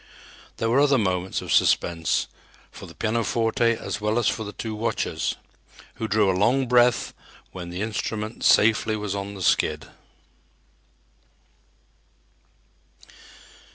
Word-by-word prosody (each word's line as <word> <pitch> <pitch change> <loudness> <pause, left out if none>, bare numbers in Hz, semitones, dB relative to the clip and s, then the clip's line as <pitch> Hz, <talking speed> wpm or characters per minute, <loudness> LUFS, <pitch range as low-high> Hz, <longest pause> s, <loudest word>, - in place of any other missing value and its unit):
There 115 - -1
were 120 +4 +3
other 140 -1 +4
moments 95 -4 -1
of - - -2
suspense, 80 -2 +2 0.5
for - - -11
the - - -14
pianoforte 115 +2 0
as 105 - -5
well 105 +2 0
as 120 - +1
for 110 - -1
the 105 - -7
two 110 +1 -6
watchers, 110 +2 -2 0.6
who 110 -1 -3
drew 105 -1 +2
a - - 0
long 120 +8 +2
breath 125 0 +3 0.4
when 90 -2 -8
the 90 +3 -4
instrument 110 0 -4
safely 110 0 +4
was 105 -2 -4
on 100 0 -5
the 95 - -6
skid. - - +1
110 Hz, 125 wpm, -24 LUFS, 100-115 Hz, 0.6 s, other